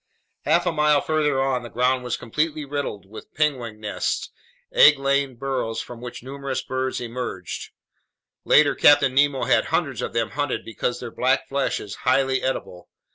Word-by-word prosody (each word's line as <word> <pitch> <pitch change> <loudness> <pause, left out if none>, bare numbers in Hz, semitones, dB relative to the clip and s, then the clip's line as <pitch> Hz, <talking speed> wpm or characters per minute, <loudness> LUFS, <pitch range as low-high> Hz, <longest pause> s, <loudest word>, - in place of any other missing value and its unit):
Half 170 +5 +3
a 175 - +2
mile 150 -2 +3
farther 150 -3 0
on, 135 -2 0
the 120 - -9
ground 125 +2 +1
was 125 - -2
completely 150 +4 -2
riddled 140 -9 -4
with 105 +3 -12
penguin 130 -8 -1
nests, 105 -1 -3 0.4
egg 150 -1 +7
laying 140 -1 0
burrows 130 -3 -3
from 120 -1 -8
which 120 -1 -8
numerous 135 0 -4
birds 130 0 -2
emerged. 120 -7 -5 0.7
Later 150 -1 +5
Captain 140 -3 +5
Nemo 140 0 +2
had - - +3
hundreds - - -1
of - - -4
them 115 -1 -1
hunted 145 -1 -2
because 120 +2 -3
their 120 -2 -7
black 130 +3 +1
flesh 140 0 -1
is 100 -1 -8
highly 135 -1 +2
edible. 90 -8 -4
130 Hz, 165 wpm, -23 LUFS, 120-145 Hz, 0.7 s, egg